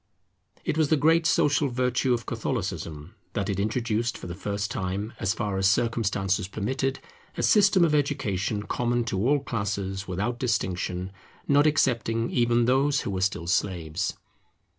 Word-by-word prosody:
It 155 - 0
was 155 -3 +3
the 155 - +4
great 165 +3 +4
social 150 -2 +3
virtue 125 +1 0
of 120 -2 0
Catholicism, 90 - -4 0.2
that 100 -2 -1
it 100 - -3
introduced 115 +2 -1
for - - -10
the 85 - -5
first 100 +2 -3
time, 95 +4 -3
as 95 - 0
far 100 -3 -2
as 95 0 +4
circumstances 100 -3 0
permitted, 130 +7 -2 0.4
a - - -1
system 200 -4 +5
of 155 - +1
education 105 -8 0
common 120 +3 0
to 110 0 -1
all 145 0 +4
classes 100 -5 -3
without 105 +7 -2
distinction, 95 -6 -1 0.4
not 145 +1 +5
excepting 115 -6 +1
even 120 -1 +2
those 135 +3 +2
who - - -3
were 95 -1 -2
still 95 -3 0
slaves. 90 -1 -1
110 Hz, 155 wpm, -26 LUFS, 95-130 Hz, 0.4 s, system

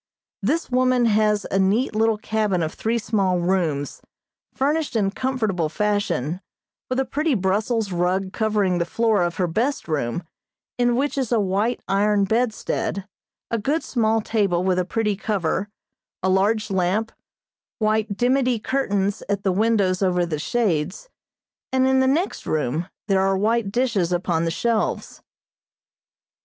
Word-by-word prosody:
This 280 - -1
woman 255 -1 +3
has 210 -2 +2
a 195 - +2
neat 210 +6 +1
little 220 0 +2
cabin 210 -5 0
of 155 - -3
three 230 +2 -1
small 200 -5 +1
rooms, 170 -6 -1 0.5
furnished 295 +1 -1
in 200 -3 +1
comfortable 215 -10 -1
fashion, 195 -5 -1 0.5
with 255 +1 0
a 265 - +1
pretty 295 +3 0
Brussels 210 +2 0
rug 185 +2 0
covering 210 -5 +1
the 170 - +1
floor 220 +2 +1
of 175 -1 0
her 185 - +1
best 225 - -1
room, 155 0 -2 0.6
in 245 -1 +3
which 280 +2 0
is 255 -3 -2
a 235 - +3
white 205 +5 0
iron 205 +1 +2
bedstead, 220 -2 -1 0.4
a 230 - 0
good 290 +10 0
small 225 -2 +1
table 200 -5 0
with 185 -1 +1
a 180 - 0
pretty 210 +2 0
cover, 200 -1 -1 0.5
a 190 - +2
large 205 +3 +1
lamp, 190 +4 0 0.7
white 215 -2 0
dimity 250 0 +2
curtains 205 -5 -1
at 200 -1 -1
the 190 - +2
windows 200 -2 +2
over 180 -2 +2
the 155 -3 -3
shades, 190 - -1 0.6
and 260 0 +3
in 265 0 +3
the 260 - +3
next 320 +8 -1
room 155 +3 -1 0.2
there 195 -2 +3
are 195 0 +2
white 215 0 +1
dishes 230 -7 0
upon 175 -2 0
the - - +1
shelves. 225 +6 -1
210 Hz, 150 wpm, -23 LUFS, 185-235 Hz, 0.7 s, woman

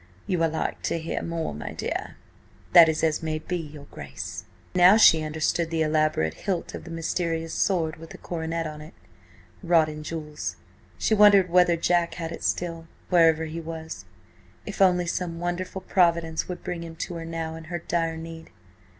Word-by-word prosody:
"You 180 -3 -1
are 165 - +3
like 160 - -3
to - - -1
hear 165 0 -3
more, 165 - -3
my 75 - -6
dear." - - -4 0.6
"That 170 -2 +9
is 160 0 -1
as 155 -2 +1
may 155 -1 -2
be, 160 +3 -4
your 150 -3 -9
Grace." 70 -1 -7 0.3
Now 180 +3 +7
she 165 -7 +7
understood 160 +2 -1
the 165 -1 0
elaborate 155 - +1
hilt 180 - -3
of - - -8
the - - -9
mysterious 165 0 -2
sword 165 -5 0
with 165 +1 -11
the - - -10
coronet 165 -1 -3
on 150 -1 -6
it, 155 +3 -12 0.7
wrought 170 -4 +3
in 155 0 -7
jewels. 150 - -5 0.4
She - - +1
wondered 200 -4 +6
whether 180 -1 +5
Jack 170 0 +1
had 165 -2 -5
it - - -7
still, 165 -1 -2 0.2
wherever 165 -2 +5
he 160 +1 -5
was. 160 - -7 0.6
If 200 -1 -5
only 180 -2 +4
some 170 -1 -3
wonderful 175 +2 -3
providence 170 -4 +1
would 180 -1 -6
bring 180 -2 -4
him 165 -1 -8
to 170 - -5
her 165 - -6
now 165 -1 -4
in 160 0 -9
her 175 +2 -4
dire 165 -1 -1
need! 165 0 -9
165 Hz, 185 wpm, -26 LUFS, 160-175 Hz, 0.7 s, That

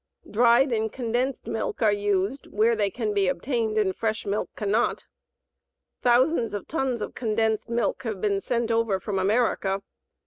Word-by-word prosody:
Dried 240 +4 +4
and 220 -1 0
condensed 245 +2 -2
milk 225 +1 -3
are 215 - +5
used 205 +5 -1
where 225 +2 +2
they 205 -2 +1
can 215 +1 -2
be 200 -2 +2
obtained 220 +3 -1
and 195 -3 +1
fresh 220 0 -2
milk 205 +1 -1
cannot. 215 +3 0 1.0
Thousands 245 -1 +3
of 205 - -6
tons 265 -7 -1
of - - -6
condensed 220 -2 0
milk 235 0 0
have 220 -6 -4
been 200 0 0
sent 235 0 -1
over 225 -4 +1
from 195 -1 -2
America. 195 -1 +1
220 Hz, 160 wpm, -25 LUFS, 205-240 Hz, 1.0 s, are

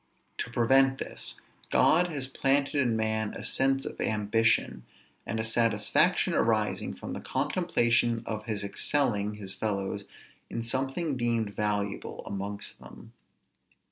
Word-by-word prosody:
To - - -2
prevent 135 +3 +4
this, - - -6 0.3
God 175 +3 +4
has 145 -6 -2
planted 135 +2 +1
in 130 -6 +2
man 110 -1 0
a - - -7
sense 135 0 +2
of - - -6
ambition, 110 +1 +1 0.4
and 115 - -2
a - - 0
satisfaction 110 -2 +2
arising 110 -10 +1
from 70 - -7
the - - -5
contemplation 120 -9 +1
of 110 -1 -4
his 110 -3 -2
excelling 105 -2 0
his 100 -2 -3
fellows 100 -1 -2 0.4
in 115 - -3
something 135 +5 -1
deemed 115 -3 0
valuable 105 -1 -2
amongst 100 +1 -6
them. - - -13
115 Hz, 130 wpm, -29 LUFS, 105-135 Hz, 0.4 s, prevent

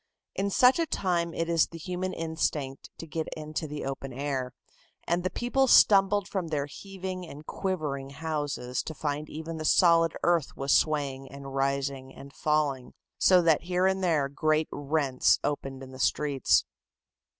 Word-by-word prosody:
In 200 +1 -1
such 250 - +5
a 330 - +1
time 175 - 0
it 165 +1 -2
is 165 -2 +3
the 165 - -10
human 180 +3 -3
instinct 160 -5 -3
to - - -8
get 160 0 -4
into 155 +1 -4
the 150 0 -5
open 135 0 -5
air, 135 -1 -3 0.6
and 175 +1 0
the 185 - 0
people 245 +7 +1
stumbled 200 -3 +5
from 190 -4 -3
their 150 -3 -1
heaving 185 +3 -7
and 150 0 -11
quivering 150 -9 -3
houses 145 -4 -3
to 160 - -7
find 150 0 -3
even 160 +1 -6
the 155 - -5
solid 165 0 +4
earth 170 -5 +1
was 135 0 -1
swaying 140 -3 0
and 140 -1 -9
rising 135 -1 -2
and 140 0 -12
falling, 150 -4 0 0.3
so 180 -2 +5
that 160 -3 +4
here 180 +1 +1
and 190 0 +1
there 155 -6 +2
great 155 +2 0
rents 145 -2 +2
opened 135 -2 -3
in 130 - -10
the 130 - -11
streets. 140 - +2
155 Hz, 165 wpm, -28 LUFS, 140-175 Hz, 0.6 s, such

